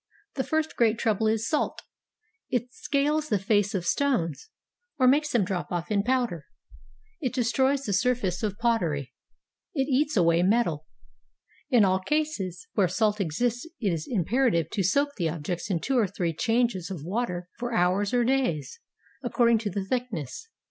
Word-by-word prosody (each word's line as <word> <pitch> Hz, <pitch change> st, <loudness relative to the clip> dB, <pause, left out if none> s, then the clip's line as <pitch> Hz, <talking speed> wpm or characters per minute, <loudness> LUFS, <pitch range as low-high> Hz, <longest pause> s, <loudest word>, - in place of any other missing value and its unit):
The 265 Hz, -, -1 dB
first 315 Hz, +2 st, -1 dB
great 225 Hz, -1 st, +3 dB
trouble 220 Hz, -1 st, +1 dB
is 220 Hz, +1 st, +1 dB
salt; 305 Hz, -, -1 dB, 0.7 s
it 245 Hz, 0 st, -2 dB
scales 295 Hz, +2 st, 0 dB
the 210 Hz, -, +3 dB
face 205 Hz, +1 st, +1 dB
of 180 Hz, -2 st, -2 dB
stones, 255 Hz, -, 0 dB, 0.5 s
or 255 Hz, -, +4 dB
makes 295 Hz, +4 st, +4 dB
them 225 Hz, -6 st, +2 dB
drop 180 Hz, -2 st, -3 dB
off 175 Hz, +1 st, -3 dB
in 200 Hz, -1 st, +3 dB
powder; 240 Hz, -, -1 dB, 0.7 s
it 255 Hz, -5 st, -2 dB
destroys 265 Hz, +3 st, +2 dB
the 205 Hz, -, -2 dB
surface 205 Hz, -4 st, +1 dB
of 205 Hz, -3 st, -2 dB
pottery; 175 Hz, -, 0 dB, 0.6 s
it 270 Hz, -2 st, +1 dB
eats 290 Hz, 0 st, +1 dB
away 170 Hz, -1 st, +4 dB
metal. 180 Hz, -6 st, +1 dB, 0.8 s
In 240 Hz, -7 st, +5 dB
all 190 Hz, 0 st, +2 dB
cases 205 Hz, -, -2 dB
where 195 Hz, -4 st, +3 dB
salt 210 Hz, +3 st, +1 dB
exists 240 Hz, -, -1 dB
it 200 Hz, -7 st, 0 dB
is 155 Hz, -2 st, -4 dB
imperative 205 Hz, -, +1 dB
to 200 Hz, -, -1 dB
soak 280 Hz, +10 st, +2 dB
the 170 Hz, -4 st, 0 dB
objects 165 Hz, +3 st, -4 dB
in 180 Hz, -4 st, +1 dB
two 265 Hz, +7 st, +1 dB
or 215 Hz, -, +3 dB
three 175 Hz, -3 st, -2 dB
changes 225 Hz, -1 st, 0 dB
of 175 Hz, -7 st, -6 dB
water 180 Hz, -1 st, -2 dB
for 240 Hz, 0 st, -3 dB
hours 190 Hz, 0 st, +2 dB
or 245 Hz, -1 st, +3 dB
days, 235 Hz, -, 0 dB, 0.4 s
accord 240 Hz, -2 st, +2 dB
ing 230 Hz, -, +5 dB
to 215 Hz, -2 st, -3 dB
the 195 Hz, 0 st, -3 dB
thickness. 245 Hz, -, -4 dB
220 Hz, 170 wpm, -27 LUFS, 180-250 Hz, 0.8 s, In